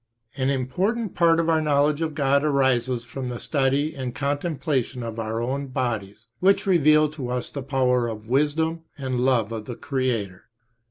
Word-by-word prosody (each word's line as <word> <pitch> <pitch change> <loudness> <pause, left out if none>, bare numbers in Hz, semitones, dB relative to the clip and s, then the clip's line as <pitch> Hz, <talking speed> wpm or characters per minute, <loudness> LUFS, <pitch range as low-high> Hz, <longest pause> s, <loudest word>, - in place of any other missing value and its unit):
An 135 -1 0
important 180 - -1
part 165 -1 +4
of 165 - +1
our 160 -1 +3
knowledge 145 0 +2
of 160 -2 -2
God 140 -1 +2
arises 130 -4 +1
from 125 +1 -5
the 120 -1 -5
study 140 +1 0
and 130 -4 -5
contemplation 145 -3 -1
of 115 0 -5
our 110 +1 -2
own 135 +3 -2
bodies, 110 -4 -3
which 195 +2 +3
reveal 155 -5 +5
to 140 -5 -6
us 125 -1 -3
the 140 - -5
power, 125 -3 +1
wisdom, 150 +9 0 0.2
and 130 -3 -2
love 120 -4 +2
of 110 -2 -5
the 120 - -6
Creator. 120 -10 -2
135 Hz, 165 wpm, -24 LUFS, 125-150 Hz, 0.2 s, reveal